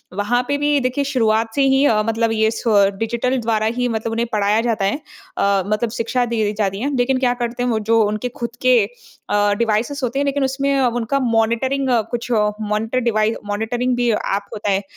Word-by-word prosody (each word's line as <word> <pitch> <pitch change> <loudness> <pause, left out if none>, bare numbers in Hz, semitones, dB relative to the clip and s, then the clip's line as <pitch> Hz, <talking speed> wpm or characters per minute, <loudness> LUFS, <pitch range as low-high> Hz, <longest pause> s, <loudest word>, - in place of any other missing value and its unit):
वहाँ 225 +5 +1
पे 285 0 0
भी 290 0 +2
देखिए 255 +3 0
शुरुआत 225 -4 +1
से 280 - +2
ही 270 +1 +3
अ, 215 -5 +3
मतलब 225 0 +1
ये 220 0 +2
स - - -6 0.4
डिजिटल 235 +3 -1
द्वारा 220 -1 0
ही 250 0 +1
मतलब 225 0 -2
उन्हें 230 +1 -1
पढ़ाया 210 +1 +2
जाता 225 -4 0
है। 200 - 0 0.4
अ, 200 -1 +2
मतलब 215 +2 0
शिक्षा 240 +2 -1
दी 220 -3 0
जाती 195 -1 -1
है। 280 +1 -1
लेकिन 255 +1 +1
क्या 245 -2 +2
करते 240 +1 -2
हैं 250 - 0
वो 220 -2 +1
जो 225 +1 +2
उनके 215 +4 -2
खुद 240 -3 -6
के 255 -2 +5 0.5
अ, 205 0 +2
डिवाइसेस 235 +6 0
होते 250 +3 -1
हैं 285 - +1
लेकिन 280 0 0
उसमें 275 +1 0
अ, 255 - +3
उनका 240 +3 -1
मॉनिटरिंग 240 +3 +1 0.2
कुछ 240 +1 -4
मॉनिटर 215 +2 0
डिवाइस 220 -2 +1
मॉनिटरिंग 235 +4 -1
भी 245 -1 +1
ऐप 200 -1 -1
होता 210 -1 -3
है। 195 +1 +1
230 Hz, 205 wpm, -19 LUFS, 215-255 Hz, 0.5 s, के